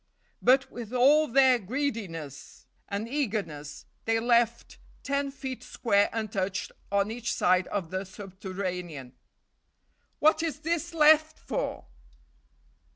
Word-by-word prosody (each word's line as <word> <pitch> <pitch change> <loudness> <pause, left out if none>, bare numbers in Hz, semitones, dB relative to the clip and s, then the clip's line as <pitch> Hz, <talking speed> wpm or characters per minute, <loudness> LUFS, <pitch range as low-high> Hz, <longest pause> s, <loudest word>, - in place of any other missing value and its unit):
But, 265 +2 +4
with 240 -1 -8
all 290 +5 +5
their 260 -1 +5
greediness 195 - -5 0.2
and 200 +3 -3
eagerness, 200 - -3 0.2
they 225 0 +2
left 235 0 +1 0.2
ten 280 0 -1
feet 265 -2 -6
square 205 -4 +1
untouched 200 -3 -2 0.2
on 200 +1 +1
each 235 0 -3
side 180 +1 +2
the 185 -1 -2
subterranean. 185 -7 -6 1.0
"What 310 +1 +4
is 315 -2 -3
this 335 +1 -2
left 310 0 +5
for?" - - -4
225 Hz, 105 wpm, -28 LUFS, 190-275 Hz, 1.0 s, all